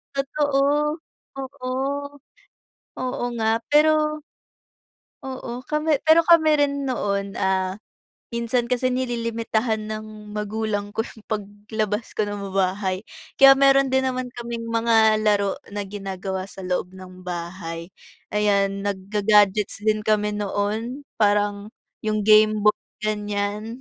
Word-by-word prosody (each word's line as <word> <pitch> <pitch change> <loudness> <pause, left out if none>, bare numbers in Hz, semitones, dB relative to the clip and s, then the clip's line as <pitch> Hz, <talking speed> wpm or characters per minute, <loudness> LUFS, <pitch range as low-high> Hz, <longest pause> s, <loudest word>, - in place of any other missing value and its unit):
Totoo, 285 +2 +1 0.4
oo. 265 -1 -6 1.3
Oo 255 -1 -3
nga 225 0 +1
pero 305 0 +3 1.0
oo, 260 -2 -6
kami 305 +1 +1
pero 315 +1 +6
kami 335 -2 +6
rin 280 -1 +1
noon, 200 -6 -2
ah, 190 0 0 0.5
minsan 235 +1 0
kasi 250 +1 0
nililimitahan 230 -3 -1
ng 215 -1 -8
magulang 210 0 -2
ko 225 - +1
yung 220 - -13
paglabas 210 +1 -3
ko 215 - +2
ng 205 -1 -5
bahay, 190 +1 0 0.3
kaya 275 0 +9
meron 275 -1 +4
din 265 0 +2
naman 255 -1 -4
kaming 235 -1 -5
mga 225 -1 +3
laro 205 -2 +2 0.2
na 205 0 -4
ginagawa 190 -1 -5
sa 190 - -10
loob 180 0 -2
ng 185 -1 -11
bahay, 170 -1 -6 0.4
ayan, 200 -1 +2
nagga-gadgets 205 +1 +2
din 215 0 +2
kami 210 -1 +1
noon, 210 +6 -2 0.2
parang 205 0 +2 0.3
yung 215 -1 -1
gameboy, 215 0 +5 0.3
ganiyan. 210 +2 -2
215 Hz, 115 wpm, -23 LUFS, 200-250 Hz, 1.3 s, kaya